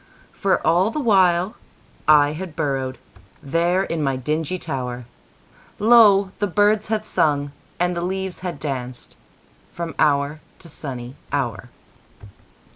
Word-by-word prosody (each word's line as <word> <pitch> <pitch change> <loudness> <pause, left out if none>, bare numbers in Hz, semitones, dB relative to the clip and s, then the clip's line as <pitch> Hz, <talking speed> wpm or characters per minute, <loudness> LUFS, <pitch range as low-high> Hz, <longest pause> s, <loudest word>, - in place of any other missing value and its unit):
For 195 -2 0
all 180 +5 +3
the 265 - -3
while 190 -5 +3 0.5
I 145 -1 +6
had 170 0 -7
burrowedThere 145 +6 -2
in 165 -2 -2
my 135 -2 0
dingy 155 +6 -2
tower, 125 -7 -5 0.7
Lo! 205 -4 +6
the 205 - +1
birds 205 +3 +2
had 215 0 -1
sung 145 -6 +1 0.3
and 180 0 +1
the 170 - -2
leaves 190 +1 -3
had 180 -5 -5
dancedFrom 130 - -8
hour 145 +1 +2 0.2
to 170 - -14
sunny 130 -3 -7
hour. 120 -6 -2
165 Hz, 120 wpm, -22 LUFS, 140-190 Hz, 0.7 s, I